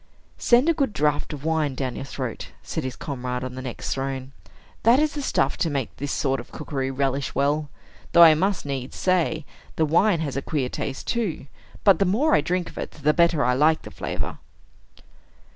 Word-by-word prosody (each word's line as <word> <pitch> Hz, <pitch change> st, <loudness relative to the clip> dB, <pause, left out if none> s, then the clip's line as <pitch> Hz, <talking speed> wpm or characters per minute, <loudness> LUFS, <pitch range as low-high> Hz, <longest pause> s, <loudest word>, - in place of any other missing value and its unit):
"Send 245 Hz, +5 st, +4 dB
a 335 Hz, -, +5 dB
good 275 Hz, -8 st, 0 dB
draught 150 Hz, +1 st, 0 dB
of 150 Hz, -1 st, -7 dB
wine 155 Hz, -4 st, 0 dB
down 130 Hz, -2 st, -3 dB
your 135 Hz, -, -5 dB
throat," 130 Hz, -3 st, -5 dB, 0.2 s
said 160 Hz, -, -4 dB
his 130 Hz, -1 st, -4 dB
comrade 125 Hz, -3 st, -4 dB
on 130 Hz, -1 st, -5 dB
the 130 Hz, -, -6 dB
next 130 Hz, -2 st, -4 dB
throne. 135 Hz, -1 st, -4 dB, 0.5 s
"That 235 Hz, +3 st, +5 dB
is 300 Hz, 0 st, +2 dB
the 295 Hz, -, -3 dB
stuff 135 Hz, -, +1 dB
to 165 Hz, -, 0 dB
make 140 Hz, -5 st, -3 dB
this 140 Hz, 0 st, -3 dB
sort 135 Hz, -1 st, 0 dB
of 120 Hz, -, -10 dB
cookery 135 Hz, -3 st, -3 dB
relish 135 Hz, 0 st, -1 dB
well. 145 Hz, +2 st, +1 dB, 0.4 s
Though 170 Hz, -, +9 dB
I 160 Hz, -2 st, +9 dB
must 190 Hz, +3 st, 0 dB
needs 135 Hz, -2 st, -4 dB
say, 165 Hz, -4 st, +1 dB, 0.3 s
the 160 Hz, -, +2 dB
wine 170 Hz, +3 st, +3 dB
has 145 Hz, -5 st, -3 dB
a 135 Hz, -, -1 dB
queer 135 Hz, -3 st, -2 dB
taste 135 Hz, +1 st, -5 dB
too. 220 Hz, -, -2 dB, 0.4 s
But 195 Hz, -5 st, +6 dB
the 195 Hz, -, +3 dB
more 250 Hz, -, +2 dB
I -, -, +5 dB
drink 175 Hz, +3 st, -1 dB
of -, -, -9 dB
it, -, -, -4 dB
the 150 Hz, +1 st, +4 dB
better 170 Hz, -5 st, +3 dB
I 125 Hz, -, +3 dB
like 155 Hz, +4 st, +3 dB
the -, -, -9 dB
flavor." -, -, -4 dB
150 Hz, 205 wpm, -24 LUFS, 135-170 Hz, 0.5 s, Though